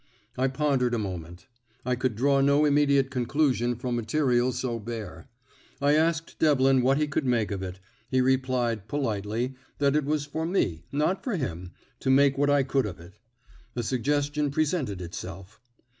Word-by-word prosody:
I 130 +1 +1
pondered 130 -3 +1
a - - 0
moment; 90 -4 -6 0.4
I 125 - +1
could 125 -2 -1
draw 135 +4 +3
no 140 +2 +4
immediate 140 -2 +3
conclusion 125 -1 +1
from 120 +1 -3
material 125 +1 +1
so 125 -1 -3
bare. 105 -8 -7 0.5
I 140 +1 +3
asked 160 +1 0
Devlin 135 -4 +4
what 135 +2 +3
he 150 0 +1
could 145 +1 -1
make 115 -4 +1
of 100 -2 -3
it; 95 0 -6 0.3
he 130 - +2
replied, 125 -4 +1
politely, 115 -2 -2 0.2
that 140 0 +2
it 150 -2 +1
was 150 0 0
for 160 +2 -4
me, 85 - -1
not 150 +7 0
for 245 -6 -1
him, 90 - -4 0.3
to - - -2
make 135 +1 +5
what 145 +1 +2
I 145 -1 +4
could 130 -2 0
of 90 - -8
it. 85 +2 -15 0.6
A 120 - -2
suggestion 145 +4 0
presented 140 - -1
itself. 90 +3 -8
130 Hz, 170 wpm, -27 LUFS, 115-145 Hz, 0.6 s, make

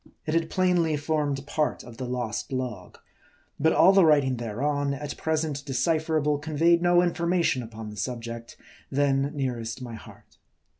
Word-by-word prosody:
It 155 - -2
had 165 -1 +1
plainly 175 -4 +2
formed 145 -2 -1
part 150 +1 -1
of 120 -1 -12
the 130 0 -4
lost 120 -3 -3
log; 125 -8 -4 0.6
but 160 +2 +4
all 190 - +6
the 195 -1 +6
writing 145 -5 +4
thereon, 140 +5 -1
at 145 +1 -6
present 155 -3 -2
decipherable, 155 +1 0
conveyed 160 +3 +2
no 175 0 +4
information 170 -5 +1
upon 110 -2 -8
the 105 - -11
subject 115 +1 -5 0.3
then 140 0 +1
nearest 120 -5 -3
my 125 -2 -7
heart. 110 - -13
145 Hz, 150 wpm, -26 LUFS, 125-160 Hz, 0.6 s, all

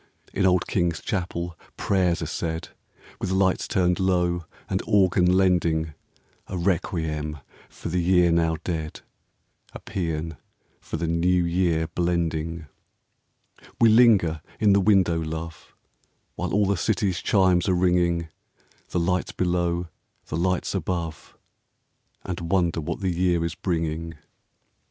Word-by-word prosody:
In 95 -1 +2
old 90 -1 +3
King's 85 -3 0
Chapel 85 -3 -3 0.2
prayers 90 -4 +1
are - - -2
said, 80 -1 -4 0.5
With - - -3
lights 95 0 +1
turned 90 -1 +1
low 90 -2 +1 0.2
and - - -1
organ 95 -3 +4
lending 85 -4 +2 0.5
A 95 - -4
requiem 80 -4 -1 0.3
for - - -7
the 90 +1 0
year 90 -1 +4
now 80 -1 +2
dead, 80 -3 -4 0.7
A - - -8
psean 80 -3 -4 0.4
for - - -5
the 85 - -2
New 85 +2 +2
Year 85 -2 +1
blending. 85 -1 -2 1.1
We 115 - +6
linger 105 -9 +5 0.2
in 105 -2 +4
the 100 - +4
window, 95 -4 +3
love, 80 +1 -6 0.6
While - - -4
all 105 0 +3
the 100 0 +1
city's 95 -3 0
chimes 95 -2 +3
are 90 - +3
ringing, 90 -2 +2 0.3
— - - -34
The 90 - -1
lights 90 +2 0
below, 85 -1 0 0.4
the - - -5
lights 90 +2 0
above, 85 -3 -4 0.4
— - - -44
And 85 -2 -4
wonder 85 -4 +1
what 75 - -4
the 95 -2 0
year 85 -1 +1
is 85 - -3
bringing. 80 -1 -3
85 Hz, 135 wpm, -25 LUFS, 80-95 Hz, 1.1 s, We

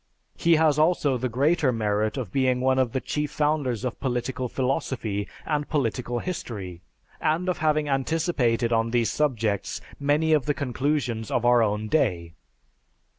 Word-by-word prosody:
He 170 0 +3
has 155 -2 +3
also 155 -4 +3
the 130 +1 -1
greater 140 +3 +2
merit 110 -1 0
of 120 -8 -4
being 130 0 +2
one 130 +1 +2
of 130 -3 +1
the 130 - -1
chief 150 +3 -2
founders 145 -6 0
of 125 - -4
political 125 0 -2
philosophy 120 -6 -2 0.2
and 150 -2 -1
political 125 -3 -1
history, 100 - -5 0.4
and 165 +4 0
of 180 -1 -1
having 155 -1 +1
anticipated 135 -5 +1
on 115 0 +2
these 115 -1 +1
subjects 115 -9 -1 0.2
many 150 +3 +2
of 150 -2 +2
the 145 - +1
conclusions 130 -4 -1
of 120 - 0
our 120 -1 +5
own 105 0 0
day. 90 - 0
130 Hz, 155 wpm, -25 LUFS, 115-150 Hz, 0.4 s, our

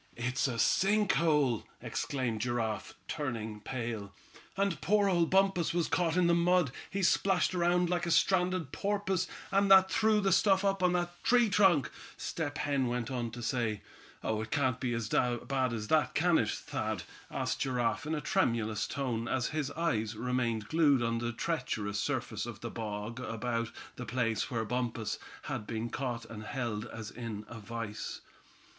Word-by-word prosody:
"It's 125 +3 0
a 120 -3 -3
sink 195 - +3
hole!" 150 -8 +2 0.2
exclaimed 120 -6 -2
Giraffe, 115 -2 -2
turning 115 -8 -3
pale. 110 -3 -5 0.4
"And 195 -6 0
poor 205 +2 +3
old 175 -3 +3
Bumpus 190 -3 +2
was 170 -2 +2
caught 175 -1 +1
in 180 - +4
the 170 - +4
mud. 170 -3 +3 0.2
He 195 0 -2
splashed 185 +1 +3
around 175 0 +2
like 175 0 0
a - - 0
stranded 180 -4 +2
porpoise, 195 -2 0 0.2
and 195 0 +3
that 190 -1 +7
threw 220 -1 +3
the 195 -1 +2
stuff 195 -1 +4
up 195 -1 +1
on 180 -1 +3
that 175 0 -2
tree 240 -2 +4
trunk," 185 -9 +4 0.3
Step 150 -2 -3
Hen 140 -3 +1
went 120 0 -2
on 120 -2 -2
to 120 +1 -8
say. 115 -4 -1 0.4
"Oh! 110 0 0
it 110 - -6
can't 130 -2 +1
be 120 -2 -1
as 115 -2 -2
bad 125 +2 +1
as 110 -2 -3
that, 155 -1 +2
can 175 +1 +4
it, 105 - +1
Thad?" - - -3 0.3
asked - - -2
Giraffe 125 +1 0
in 160 - 0
a 150 - -2
tremulous 115 -4 +1
tone, 120 -5 -2
as 130 0 0
his 150 -3 -2
eyes 115 -10 -1
remained 115 -2 -1
glued 145 -6 +4
on 115 0 0
the 120 0 -2
treacherous 110 -7 -2
surface - - -2
of - - -8
the - - -5
bog 110 +1 -5
about 115 -1 -2 0.3
the 125 - -5
place 115 -4 0
where 115 -3 -1
Bumpus 115 -2 -2 0.2
had 105 - -4
been 115 +1 -3
caught 120 -4 -3
and 115 -1 -8
held 115 -2 -3
as 110 -1 -7
in 110 -3 -6
a 115 - -8
vise. 115 0 -5
130 Hz, 175 wpm, -31 LUFS, 115-175 Hz, 0.4 s, that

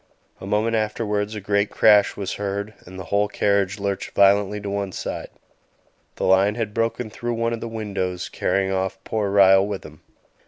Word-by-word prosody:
A 95 - -8
moment 110 +3 +1
afterwards 105 -1 -1
a - - -4
great 100 +1 0
crash 105 -2 +4
was 100 -2 -3
heard, 100 +1 -4
and 95 +1 -10
the 95 - -6
whole 105 +1 +3
carriage 100 -1 0
lurched 100 -1 -4
violently 100 +1 +4
to 100 - -6
one 100 -1 -2
side; - - -5 0.9
the - - -5
lion 95 +2 +4
had 110 -3 -3
broken 115 0 -1
through 120 +2 -3
one 115 0 -1
of 115 - -5
the - - -4
windows, 100 -5 -3
carrying 95 0 -1
off 95 0 -1
poor 105 -2 -1
Ryall 95 0 +5
with 100 -2 -5
him. 75 -1 -13
100 Hz, 185 wpm, -23 LUFS, 95-105 Hz, 0.9 s, Ryall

